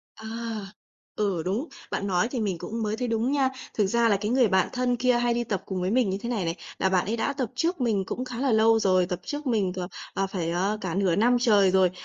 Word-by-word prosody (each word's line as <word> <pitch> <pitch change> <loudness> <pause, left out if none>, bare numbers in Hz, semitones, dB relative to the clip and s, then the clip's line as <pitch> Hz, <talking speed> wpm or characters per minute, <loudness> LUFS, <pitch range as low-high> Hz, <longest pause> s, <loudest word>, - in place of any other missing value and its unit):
À! 220 - -10 0.9
Ừ, 195 -6 0
đúng. 210 - -2 0.2
Bạn 200 - -2
nói 185 +3 +1
thì 250 - -2
mình 195 -5 -1
cũng 225 +6 -4
mới 215 0 -1
thấy 250 +1 -2
đúng 230 +3 0
nha. 275 -2 +2 0.2
Thực 210 - +2
ra 235 +3 +2
là 205 - +4
cái 210 +2 -3
người 250 -2 +4
bạn 190 -1 +2
thân 250 -1 0
kia 250 +1 +2
hay 240 0 +1
đi 240 0 -1
tập 200 -5 -2
cùng 190 -2 -3
với 180 +1 0
mình 235 -2 +2
như 195 - -2
thế 235 - -5
này 225 -6 -1
này, 165 0 -1 0.2
là 190 - +2
bạn 185 -2 +2
ấy 225 - -1
đã 235 - 0
tập 260 -5 -3
trước 335 -1 -1
mình 220 -6 +1
cũng 250 +6 -4
khá 245 -2 -7
là 270 -2 +2
lâu 225 +1 +5
rồi, 185 -4 +3
tập 180 -1 -4
trước 295 0 -5
mình 210 -7 +1
cả, 185 0 -4 0.3
ờ, 195 - 0
phải, 180 -4 -3
ờ, 195 +5 0
cả 180 -4 -3
nửa 190 -3 +2
năm 240 +4 +4
trời 205 -6 +5
rồi, 190 -1 +4
215 Hz, 270 wpm, -26 LUFS, 190-245 Hz, 0.9 s, lâu